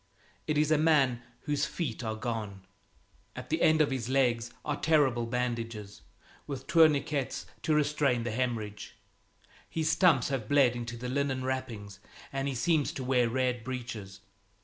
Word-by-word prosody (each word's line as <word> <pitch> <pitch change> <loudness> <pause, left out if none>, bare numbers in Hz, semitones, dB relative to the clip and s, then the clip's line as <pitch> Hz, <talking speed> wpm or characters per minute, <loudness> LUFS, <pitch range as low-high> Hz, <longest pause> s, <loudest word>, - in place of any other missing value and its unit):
It 150 -1 +1
is 150 +1 +2
a 155 - +4
man 140 -6 +3 0.2
whose 145 0 0
feet 140 -8 -4
are 110 -1 -2
gone. 110 -4 -4 0.7
At - - -8
the - - +1
end 155 0 +5
of 145 - +2
his 125 -3 -3
legs 120 -3 +1
are 145 - 0
terrible 135 -7 +2
bandages, 115 -4 -3 0.5
with 140 -2 -5
tourniquets 155 -4 +2 0.2
to 155 - +1
restrain 145 -5 +2
the 120 - -2
hemorrhage. 110 -3 -3 0.7
His 160 -1 0
stumps 165 -10 +4
have 130 -6 -3
bled 135 -4 +4
into 120 0 -5
the 125 +2 -5
linen 135 0 -1
wrappings, 115 -7 -4 0.3
and 135 0 -1
he 135 - -2
seems 150 +4 +1
to 140 -4 -5
wear 125 -2 +2
red 125 -1 0
breeches. 115 -7 -6
130 Hz, 155 wpm, -30 LUFS, 115-145 Hz, 0.7 s, end